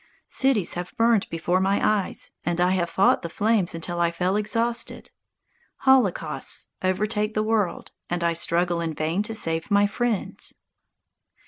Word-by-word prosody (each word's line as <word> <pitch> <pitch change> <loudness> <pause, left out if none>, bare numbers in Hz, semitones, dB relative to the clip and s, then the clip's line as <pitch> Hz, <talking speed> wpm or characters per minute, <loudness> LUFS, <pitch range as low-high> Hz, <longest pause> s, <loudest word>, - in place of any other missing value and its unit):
Cities 260 -9 +1
have 180 +7 -6
burned 230 -3 +3
before 170 +2 0
my 195 +1 +2 0.3
eyes, - - -6
and 175 +1 -1
I 180 +1 +3
have 175 -2 0
fought 190 +3 +3
the 170 - -5
flames 205 -2 +1
until 175 +1 -4
I 170 -1 +3
fell 180 +3 -1
exhausted. 230 +3 -1 0.7
Holocausts 195 - +1
overtake 210 +3 0
the 215 - +1
world, 215 -4 -1 0.2
and 175 0 -2
I 170 0 +2
struggle 170 +1 +1
in 165 -2 -3
vain 160 +6 0
to 220 +1 -4
save 165 -4 -1
my 205 0 +4
friends. 225 0 -2
190 Hz, 150 wpm, -24 LUFS, 170-215 Hz, 0.7 s, my